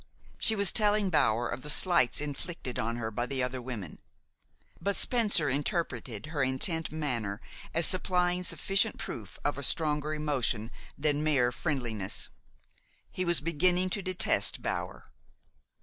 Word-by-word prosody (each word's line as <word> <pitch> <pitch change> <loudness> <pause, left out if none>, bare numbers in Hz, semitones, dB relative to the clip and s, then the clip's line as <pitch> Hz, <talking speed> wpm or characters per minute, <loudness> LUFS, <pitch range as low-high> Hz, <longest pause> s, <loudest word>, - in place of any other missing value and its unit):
She 220 - +5
was 200 -3 +2
telling 210 -3 +3
Bower 120 -6 +2
of 130 - -5
the 150 - -7
slights 170 -5 +3
inflicted 145 -2 -5
on 115 +1 -2
her 110 -2 -4
by 120 +3 -2
the 130 0 -1
other 125 0 -3
women; 115 -9 -7 0.8
but 200 +3 0
Spencer 210 -10 +5
interpreted 130 - -2
her 155 -2 -3
intent 155 +5 +2
manner 120 -10 -3 0.3
as 165 0 +2
supplying 180 -1 +1
sufficient 195 +2 0
proof - - -7
of - - 0
a - - -5
stronger 150 -1 0
emotion 130 -7 -2 0.3
than 150 0 0
mere 135 -6 +2
friendliness. 120 - -2 0.8
He 185 - -3
was 175 -3 +3
beginning 180 +4 +1
to 200 - -1
detest 185 +2 +1
Bower. - - -5
150 Hz, 140 wpm, -29 LUFS, 125-180 Hz, 0.8 s, She